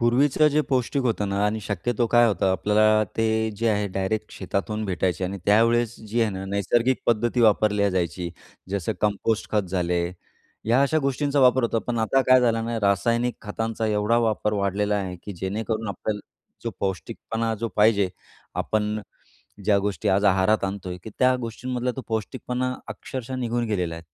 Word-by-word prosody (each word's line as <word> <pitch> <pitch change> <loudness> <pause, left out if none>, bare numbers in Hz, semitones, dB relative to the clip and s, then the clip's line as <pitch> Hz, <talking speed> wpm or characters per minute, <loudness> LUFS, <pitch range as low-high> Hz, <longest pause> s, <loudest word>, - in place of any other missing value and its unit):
पूर्वीचं 135 +5 +4
जे 150 +1 +2
पौष्टिक 130 +1 0
होतं 110 -4 0
ना 100 +1 0
आणि 110 +1 -1
शक्यतो 110 +4 -1
काय 120 0 +6
होतं, 95 -2 0
आपल्याला 110 +2 +3
ते 115 - +2 0.3
जे 115 +1 +1
आहे 105 -1 +1
डायरेक्ट 95 +3 -2
शेतातून 105 +3 -3
भेटायचे 95 -2 -1
आणि 100 +2 -4
त्यावेळेस 115 +2 +3
जी 115 +3 0
आहे 110 -2 +2
ना 95 0 -5
नैसर्गिक 115 +6 +1
पद्धती 120 +1 +2
वापरल्या 105 -2 +3
जायची 90 -1 -2 0.4
जसं 100 -4 -1
कंपोस्ट 105 +1 0
खत 105 -1 +3
झाले. 90 -1 0 0.6
ह्या 120 +4 +3
अशा 150 +3 +2
गोष्टींचा 140 0 0
वापर 130 0 +5
होतो. 115 -1 +1
पण 120 -1 -3
आता 110 +5 +2
काय 130 0 +8
झालं 115 -2 +1
ना 115 0 -2
रासायनिक 115 +5 +1
खतांचा 115 +1 -3
एवढा 105 +2 +2
वापर 110 -2 0
वाढलेला 100 +1 0
आहे, 95 -2 -3
की 100 - -6
जेणेकरून 110 +4 -3
आपल्याला 105 +2 -3 0.4
जो - - -1
पौष्टिकपणा 110 +5 -2
जो 115 - -1
पाहिजे, 105 -3 +4 0.5
आपण 105 0 -1 0.6
ज्या 100 0 +4
गोष्टी 100 -4 -2
आज 100 +2 +2
आहारात 95 +2 +3
आणतोय, 95 -2 -4
की 110 - -7
त्या 130 0 +4
गोष्टींमधला 125 +2 -3
तो - - -3
पौष्टिकपणा 125 +3 -2
अक्षरशः 130 0 -6
निघून 120 -1 -1
गेलेला 90 -5 -1
आहे. 85 0 -10
110 Hz, 165 wpm, -24 LUFS, 100-120 Hz, 0.6 s, काय